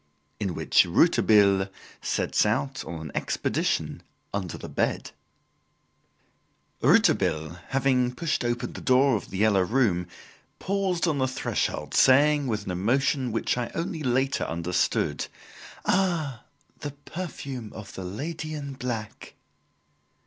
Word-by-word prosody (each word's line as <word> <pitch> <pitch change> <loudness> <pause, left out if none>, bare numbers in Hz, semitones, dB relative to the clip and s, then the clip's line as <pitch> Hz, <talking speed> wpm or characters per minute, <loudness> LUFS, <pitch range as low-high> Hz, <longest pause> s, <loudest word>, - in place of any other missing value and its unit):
In 95 -5 -2
Which - - +4
Rouletabille 100 -3 +4 0.3
Sets - - +1
Out 130 +5 -1
on 85 -2 -6
an 80 -2 -7
Expedition - - -1 0.3
Under 95 -4 -3
the - - -8
Bed - - -1 1.7
Rouletabille 80 +2 +3
having 130 -2 +1
pushed 165 -3 -1
open 120 0 -2
the - - -8
door 130 0 +4
of 105 - -4
"The 95 - -5
Yellow 105 -1 +4
Room" 95 -4 +1 0.5
paused 190 -3 0
on 150 -4 +1
the 130 - +2
threshold 130 +1 -2
saying, 145 +2 +5
with 105 -3 -2
an 95 - -3
emotion 130 - +1
which 115 +2 0
I 120 - -2
only 165 -1 -3
later 130 0 +1
understood, 85 +2 0 0.6
"Ah, 165 - 0 0.3
the 145 -2 -5
perfume 140 -10 -6
of 105 -2 -9
the 95 - -6
lady 155 - -5
in 140 -2 -5
black!" 120 -5 -5
125 Hz, 125 wpm, -26 LUFS, 100-140 Hz, 1.7 s, saying